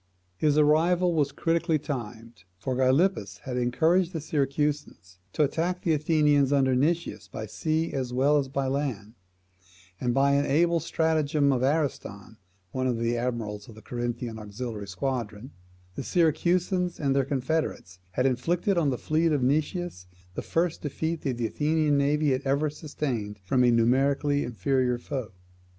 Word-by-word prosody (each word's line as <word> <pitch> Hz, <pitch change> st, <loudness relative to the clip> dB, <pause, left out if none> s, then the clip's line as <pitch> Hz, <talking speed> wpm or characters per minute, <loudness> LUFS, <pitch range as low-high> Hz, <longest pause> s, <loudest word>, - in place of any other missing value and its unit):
His 150 Hz, +8 st, +2 dB
arrival 170 Hz, +4 st, +3 dB
was 145 Hz, -3 st, +1 dB
critically 165 Hz, +1 st, +1 dB
timed; 115 Hz, -, -7 dB
for 130 Hz, +6 st, -3 dB
Gylippus 130 Hz, -, +1 dB
had 130 Hz, -, -4 dB
encouraged 160 Hz, +9 st, +2 dB
the 165 Hz, -, -2 dB
Syracusans 145 Hz, -, -2 dB
to 155 Hz, -, +2 dB
attack 170 Hz, +5 st, -1 dB
the 165 Hz, -, +2 dB
Athenians 150 Hz, -2 st, +3 dB
under 135 Hz, -2 st, +3 dB
Nicias 165 Hz, +6 st, 0 dB
by 110 Hz, -, -6 dB
sea 160 Hz, +8 st, -2 dB
as 130 Hz, -2 st, -2 dB
well 140 Hz, +4 st, +3 dB
as 135 Hz, -, -2 dB
by 135 Hz, 0 st, -2 dB
land, 130 Hz, -6 st, -2 dB, 0.9 s
and 125 Hz, -, 0 dB
by 135 Hz, +3 st, +3 dB
an 140 Hz, +1 st, +2 dB
able 170 Hz, +4 st, +3 dB
stratagem 155 Hz, -3 st, +1 dB
of 125 Hz, -, 0 dB
Ariston, 130 Hz, -, -2 dB, 0.3 s
one 130 Hz, +3 st, -1 dB
of 125 Hz, -2 st, 0 dB
the 115 Hz, +1 st, 0 dB
admirals 115 Hz, -4 st, -3 dB
of 110 Hz, -, -12 dB
the 110 Hz, -, -14 dB
Corinthian 120 Hz, -1 st, -4 dB
auxiliary 105 Hz, 0 st, -6 dB
squadron, 115 Hz, +3 st, -4 dB, 0.4 s
the -, -, -5 dB
Syracusans 175 Hz, +2 st, +1 dB
and 140 Hz, -2 st, +1 dB
their 135 Hz, -, +3 dB
confederates 130 Hz, -, -2 dB
had 125 Hz, -, 0 dB
inflicted 170 Hz, +9 st, +1 dB
on 150 Hz, -4 st, +2 dB
the 125 Hz, -, -1 dB
fleet 160 Hz, +4 st, +1 dB
of 145 Hz, -4 st, +1 dB
Nicias 145 Hz, -, -1 dB, 0.3 s
the -, -, -4 dB
first 170 Hz, 0 st, -1 dB
defeat 160 Hz, +2 st, -3 dB
that 130 Hz, -4 st, -2 dB
the 120 Hz, -, -1 dB
Athenian 150 Hz, +4 st, +1 dB
navy 145 Hz, +1 st, +2 dB
had 130 Hz, +1 st, 0 dB
ever 140 Hz, +2 st, 0 dB
sustained 130 Hz, -9 st, -4 dB
from 125 Hz, +5 st, +2 dB
a 125 Hz, -, +5 dB
numerically 135 Hz, +5 st, +2 dB
inferior 125 Hz, +3 st, 0 dB
foe. 125 Hz, -2 st, -5 dB
140 Hz, 155 wpm, -27 LUFS, 120-155 Hz, 0.9 s, a